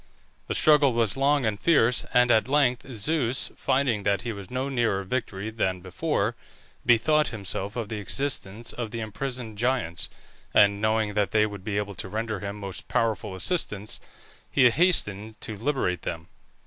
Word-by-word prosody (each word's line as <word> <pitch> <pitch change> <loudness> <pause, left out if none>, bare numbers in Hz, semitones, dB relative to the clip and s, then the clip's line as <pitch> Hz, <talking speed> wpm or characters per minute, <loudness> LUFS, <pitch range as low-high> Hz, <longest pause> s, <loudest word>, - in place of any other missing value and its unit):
The - - -2
struggle 150 -4 +5
was 115 -4 +1
long 140 0 +2
and 105 -2 -1
fierce, 125 -7 +3
and 125 0 +4
at 110 0 +4
length 135 -2 +1
Zeus, 125 +2 +1
finding 130 -5 +1
that 100 0 +1
he 120 - -3
was 100 -3 -8
no 130 +2 -2
nearer 115 -7 0
victory 105 -1 -3
than 95 -5 -1
before, 90 -1 -1 0.5
bethought 150 +6 +4
himself 100 -1 -3
of 115 -3 -3
the 110 - -4
existence 115 -1 -2
of 120 -3 -4
the 115 - -5
imprisoned 115 0 -4
Giants, 120 -9 0 0.5
and 100 0 +5
knowing 110 -1 +1
that 105 -1 +1
they 110 -1 +3
would 100 -3 -7
be 100 -1 -2
able 105 0 -2
to 95 - -6
render 110 0 -3
him 100 +1 -5
most 100 -2 -7
powerful 110 -3 -1
assistance, 105 - -2 0.5
he 130 -3 +5
hastened 110 - +1
to 110 - -5
liberate 110 -6 -1
them. 80 0 -5
110 Hz, 165 wpm, -26 LUFS, 100-125 Hz, 0.5 s, struggle